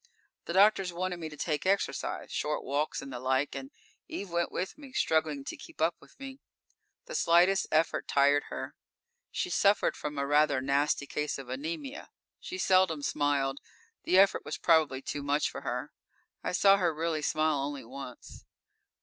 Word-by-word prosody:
_ - - -19
_The 170 - -2
doctors 195 -2 +5
wanted 180 +1 -3
me 160 -2 -5
to 150 - -11
take 150 -2 -1
exercise 195 +1 -1
short 150 0 -2
walks 145 +2 -1
and 135 -1 -8
the 125 - -5
like, 130 +2 0
and 270 - -6 0.4
Eve 200 - -6
went 170 0 0
with 185 - -3
me, 280 -3 -13
struggling 155 - +1
to - - -5
keep - - -14
up 165 +2 +2
with - - -20
me. 270 0 -8 0.7
The - - -8
slightest 180 - +4
effort 160 +1 +1
tired 145 +1 +3
her. - - -6 0.6
She 365 - -3
suffered 200 - +3
from 150 -1 -5
a 140 - 0
rather 145 -1 +3
nasty 140 +2 +1
case 150 +1 -3
of 135 -2 -9
anemia. 165 - -5 0.3
She 370 - -6
seldom 185 - +3
smiled; 140 -2 0 0.4
the 185 - +2
effort 195 +1 +5
was - - -5
probably 155 -5 +3
too 145 - -4
much 145 +1 0
for - - -7
her. - - -4 0.5
I - - -2
saw 195 +2 +6
her 175 -3 +2
really 160 -1 -1
smile 155 0 +1
only 140 -2 -4
once. 130 0 -10
155 Hz, 175 wpm, -30 LUFS, 140-185 Hz, 0.7 s, saw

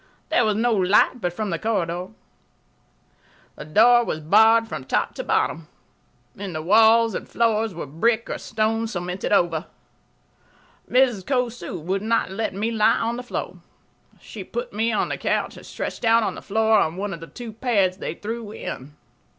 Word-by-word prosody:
There 245 - +3
was 215 -1 +1
no 235 +2 +2
light 205 +5 +3
but 175 - -1
from 205 +2 -4
the 165 - -2
corridor. 180 -5 -2 1.5
The - - -9
door 235 +9 +5
was 155 - -3
barred 220 +8 +5
from 175 - -6
top - - 0
to - - -5
bottom. 160 -1 0 0.7
The 190 -5 -6
walls 225 +4 +5
and - - -5
floors 225 -3 +1
were 170 - -5
brick 220 - 0
or - - -4
stone 225 +1 -1
cemented 180 -3 -4
over. 170 -4 +2 1.2
Mrs. 250 -6 +3
Cosu 245 -6 -2
would 185 +5 -2
not 220 -3 0
let 210 0 -3
me 215 +4 -1
lie 220 0 +3
on 230 +1 -1
the 245 - -5
floor. 245 - -5 0.6
She - - -9
put 485 0 -6
me 225 +2 0
on 215 - 0
the - - -3
couch - - -1
and - - -13
stretched - - -6
out 230 0 +4
on - - -1
the - - -9
floor 220 +1 +2
on 160 +1 0
one 200 0 -3
of 170 - -7
the 165 - -10
two 235 +1 -9
pads 205 -6 +1
they 170 - -5
threw 225 +1 -6
in. 145 -8 -7
215 Hz, 175 wpm, -23 LUFS, 180-230 Hz, 1.5 s, door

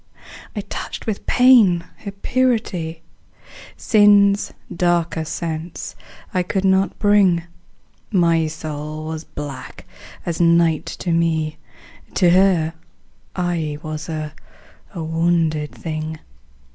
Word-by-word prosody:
I 210 - -2
touched 200 - -6
with 215 -3 -4
pain 230 -9 +5
her 205 - -7
purity; 200 -8 -1 0.7
Sin's 205 -1 +4 0.2
darker 170 -2 +1
sense 160 +1 -5 0.4
I 185 - +2
could 190 +2 -1
not 190 0 +2
bring: 200 -5 +4 0.7
My 170 -4 +3
soul 155 0 -6
was 160 0 -5
black 145 -3 -8 0.4
as 170 0 -2
night 170 -2 +3
to 175 - -4
me: 160 -2 +1 0.6
To 175 -2 +4
her 180 -3 +3 0.6
I 170 -5 -1
was 155 +1 -5
a 155 -1 -4 0.6
wounded 160 -2 0
thing. 155 0 -5
170 Hz, 100 wpm, -20 LUFS, 160-190 Hz, 0.7 s, pain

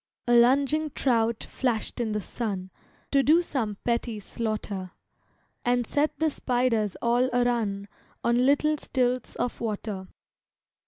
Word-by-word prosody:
A 240 - +3
lunging 275 +6 +4
trout 230 -3 +1
flashed 245 -4 -2
in 230 -2 -1
the 210 0 -1
sun, 195 -3 -4 0.4
To 275 - +5
do 320 +6 +5
some 225 - -2
petty 235 -1 -1
slaughter, 205 -3 -4 0.7
And 245 0 +2
set 295 +6 0
the 315 -1 +1
spiders 245 -6 0
all 240 +2 +3
a 245 0 +3
run 210 -5 -1 0.4
On 235 +1 +3
little 300 +2 +3
stilts 250 -2 -1
of 245 - -3
water. 210 -3 -3
240 Hz, 130 wpm, -27 LUFS, 215-255 Hz, 0.7 s, To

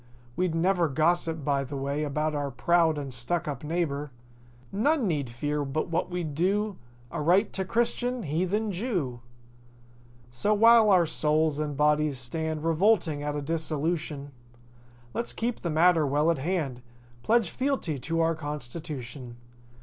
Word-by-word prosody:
We'd 180 -2 0
never 175 0 +2
gossip 160 +1 +1
by 140 -1 +1
the 140 +1 -6
way 140 +2 -2
About 150 +1 -1
our 145 -1 -2
proud 160 +5 +2
and 140 -2 -5
stuckup 145 +2 -2
neighbor. 150 -2 -2 0.6
None 270 +6 +2
need 145 -7 -1
fear 145 +5 -2
but 140 +4 -2
what 170 +2 -1
we'd 175 -4 -3
do 200 +5 0 0.3
Aright 180 +7 +2
to 190 - -1
Christian—Heathen—^Jew. 205 - -1 1.1
So 120 - +1
while 230 0 +7
our 185 -3 +5
souls 155 -1 +1
and 150 -2 -3
bodies 150 -1 +2
stand 155 +5 -3
Revolting 165 -3 +2
at 145 0 -2
a 145 - -3
dissolution, 155 -2 -2 0.8
Let's 235 - -3
keep 235 +1 -2
the 170 - -3
matter 160 -1 +4
well 150 +4 +2
at 160 - -2
hand— 145 -5 -2 0.4
Pledge 225 - +2
fealty 255 - -1
to 165 +6 -1
our 165 0 +2
constitution. 145 -4 -6
160 Hz, 135 wpm, -27 LUFS, 145-180 Hz, 1.1 s, while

